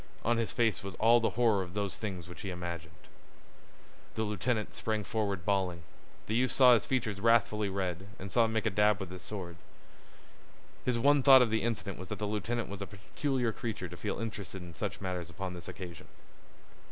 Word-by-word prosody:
On 120 Hz, +1 st, +3 dB
his 115 Hz, -1 st, 0 dB
face 115 Hz, -7 st, +1 dB
was 100 Hz, -1 st, -6 dB
all 115 Hz, +2 st, +5 dB
the 115 Hz, -, +1 dB
horror 115 Hz, -5 st, +4 dB
of 90 Hz, 0 st, -7 dB
those 100 Hz, -2 st, -1 dB
things 95 Hz, -6 st, -5 dB
which 90 Hz, -, -10 dB
he 100 Hz, -, -4 dB
imagined. 85 Hz, -2 st, -6 dB, 1.2 s
The 110 Hz, -, 0 dB
lieutenant 105 Hz, +2 st, -1 dB
sprang 110 Hz, -1 st, -2 dB
forward 100 Hz, -4 st, -2 dB
bawling. 95 Hz, -4 st, 0 dB, 0.4 s
The 110 Hz, -, -3 dB
youth 125 Hz, +2 st, +3 dB
saw 125 Hz, -2 st, +7 dB
his 110 Hz, -4 st, +2 dB
features 110 Hz, -6 st, -1 dB
wrathfully 110 Hz, -2 st, +3 dB
red, 95 Hz, -1 st, -3 dB
and 95 Hz, +1 st, -7 dB
saw 115 Hz, +2 st, +4 dB
him 110 Hz, -, -2 dB
make 110 Hz, -1 st, 0 dB
a 110 Hz, -, +2 dB
dab 105 Hz, 0 st, +3 dB
with 95 Hz, -2 st, -6 dB
his 90 Hz, -1 st, -8 dB
sword. 90 Hz, -3 st, -6 dB, 1.3 s
His 125 Hz, -2 st, +2 dB
one 140 Hz, +4 st, +5 dB
thought 130 Hz, -1 st, +9 dB
of 115 Hz, -, -1 dB
the 110 Hz, -, +2 dB
incident 110 Hz, -5 st, -2 dB
was 95 Hz, -, -7 dB
that 105 Hz, -, -4 dB
the 105 Hz, -, -2 dB
lieutenant 110 Hz, +3 st, -2 dB
was 100 Hz, 0 st, -7 dB
a 100 Hz, -, -4 dB
peculiar 120 Hz, +4 st, -2 dB
creature 110 Hz, -4 st, -4 dB
to 90 Hz, -, -8 dB
feel 100 Hz, +3 st, -3 dB
interested 105 Hz, -5 st, -5 dB
in 85 Hz, -1 st, -10 dB
such -, -, -4 dB
matters 90 Hz, -2 st, -3 dB
upon 90 Hz, +2 st, -5 dB
this 85 Hz, -1 st, -9 dB
occasion. 85 Hz, -4 st, -8 dB
105 Hz, 200 wpm, -31 LUFS, 95-115 Hz, 1.3 s, thought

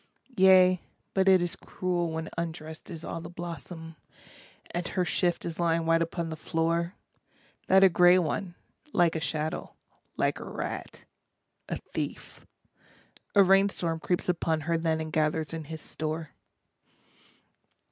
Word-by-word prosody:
Yea, 185 Hz, -1 st, +6 dB, 0.3 s
but 190 Hz, 0 st, +2 dB
it 185 Hz, -2 st, +6 dB
is 175 Hz, -, -3 dB
cruel 175 Hz, -2 st, -2 dB
when 160 Hz, 0 st, -3 dB
undressed 160 Hz, -1 st, -5 dB
is 165 Hz, -2 st, -7 dB
all 165 Hz, -, -5 dB
the 165 Hz, -, -8 dB
blossom, 170 Hz, -1 st, -7 dB, 0.8 s
And 175 Hz, +1 st, -2 dB
her 180 Hz, -, 0 dB
shift 175 Hz, +1 st, 0 dB
is 170 Hz, 0 st, -5 dB
lying 165 Hz, -1 st, +2 dB
white 165 Hz, 0 st, +3 dB
upon 165 Hz, 0 st, -2 dB
the -, -, -3 dB
floor, 165 Hz, +2 st, -1 dB, 0.7 s
That 190 Hz, 0 st, +6 dB
a -, -, +10 dB
grey 180 Hz, 0 st, +6 dB
one, 180 Hz, +1 st, -1 dB, 0.4 s
like 175 Hz, -2 st, +3 dB
a -, -, 0 dB
shadow, 155 Hz, 0 st, -3 dB, 0.4 s
like -, -, +1 dB
a -, -, -6 dB
rat, -, -, -6 dB, 0.6 s
a -, -, -2 dB
thief, -, -, -6 dB, 0.9 s
a 200 Hz, -, +8 dB
rain 195 Hz, +1 st, +5 dB
storm 165 Hz, -4 st, -2 dB
Creeps 175 Hz, +2 st, -1 dB
upon 165 Hz, -3 st, 0 dB
her 165 Hz, +3 st, 0 dB
then 160 Hz, -1 st, 0 dB
and 160 Hz, -1 st, -5 dB
gathers 155 Hz, 0 st, +1 dB
in 160 Hz, -1 st, -5 dB
his 160 Hz, +1 st, -6 dB
store. 155 Hz, -1 st, -4 dB
165 Hz, 145 wpm, -28 LUFS, 160-180 Hz, 0.9 s, a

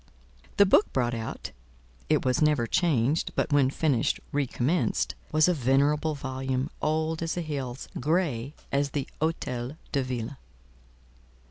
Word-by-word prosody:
The 200 Hz, -, +7 dB
book 200 Hz, -, +4 dB
brought 120 Hz, -2 st, +1 dB
out 115 Hz, -1 st, -5 dB, 0.6 s
(it -, -, +2 dB
was 130 Hz, +2 st, +2 dB
never 150 Hz, -6 st, +3 dB
changed, 150 Hz, -1 st, +1 dB
but -, -, 0 dB
when 140 Hz, -2 st, +5 dB
finished, 140 Hz, -4 st, +1 dB
recommenced) 145 Hz, +3 st, 0 dB, 0.2 s
was 155 Hz, +1 st, +4 dB
a 180 Hz, -, +4 dB
venerable 145 Hz, +3 st, +2 dB
volume, 130 Hz, +1 st, -3 dB
old 155 Hz, +1 st, 0 dB
as 165 Hz, -1 st, -1 dB
the 175 Hz, -, -1 dB
hills—grey 145 Hz, 0 st, -2 dB, 0.2 s
as 140 Hz, +1 st, +1 dB
the 140 Hz, -1 st, -3 dB
Hôtel 135 Hz, -4 st, -2 dB
de 140 Hz, -, +1 dB
Ville. 130 Hz, +1 st, -4 dB
140 Hz, 130 wpm, -27 LUFS, 130-155 Hz, 0.6 s, The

